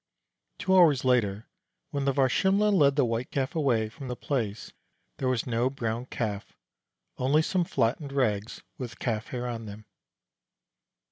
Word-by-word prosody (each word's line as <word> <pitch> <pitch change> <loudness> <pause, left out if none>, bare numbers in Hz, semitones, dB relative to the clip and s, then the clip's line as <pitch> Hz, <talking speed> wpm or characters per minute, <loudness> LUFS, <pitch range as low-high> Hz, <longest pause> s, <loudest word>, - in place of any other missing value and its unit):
Two 190 +1 +1
hours 155 -8 +5
later, 110 -5 +1 0.4
when 140 -1 -2
the 140 - +3
Varsimle' 190 - +3
led 140 -7 +4
the 140 -3 +3
White 115 +1 -2
Calf 135 -2 -2
away 125 -8 +2
from 130 +5 -9
the 125 - -3
place, 115 -7 -3 0.5
there 130 - -1
was 130 -2 0
no 120 +1 +1
Brown 120 -2 -3
Calf, 105 -5 -4 0.6
only 140 +5 +3
some 185 +2 +1
flattened 140 -1 -1
rags 110 -6 -1 0.2
with 120 -3 -6
calf 110 -2 -2
hair 125 -1 -4
on 115 -2 -5
them. 105 +1 -10
125 Hz, 150 wpm, -28 LUFS, 115-140 Hz, 0.6 s, hours